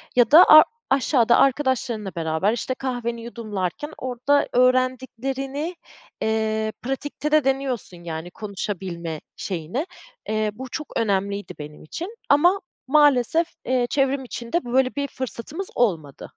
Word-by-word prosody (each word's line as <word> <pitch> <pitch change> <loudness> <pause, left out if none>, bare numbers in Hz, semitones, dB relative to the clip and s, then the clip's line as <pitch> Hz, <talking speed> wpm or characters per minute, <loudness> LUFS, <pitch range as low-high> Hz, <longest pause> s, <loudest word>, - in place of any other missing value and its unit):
ya 245 -1 +4
da 330 +4 +10
ar 310 0 +11 0.3
aşağıda 255 -3 +3
arkadaşlarınla 255 -6 +1
beraber, 165 +6 0
işte, 250 +2 -2
kahveni 240 -3 -3
yudumlarken 220 - -4
orada 260 +3 +1
öğrendiklerini, 260 +4 0 0.5
eee, 220 0 0
pratikte 290 +3 -4
de 305 -2 +5
deniyorsun 260 -10 -2
yani 165 +1 -6
konuşabilme 185 -6 -5
şeyini. 185 - -3 0.4
Eee, 215 -1 0
bu 260 +3 -8
çok 305 +3 -6
önemliydi 200 -1 -1
benim 150 0 -9
için 350 - -6
ama 350 +7 +4 0.3
maalesef, 295 +2 +4 0.2
eee, 250 -1 +1
çevrim 275 -1 +1
içinde 240 +4 -3
böyle 255 +2 +1
bir 280 0 -1
fırsatımız 265 - -5
olmadı. 165 - -1
245 Hz, 120 wpm, -23 LUFS, 210-275 Hz, 0.5 s, ar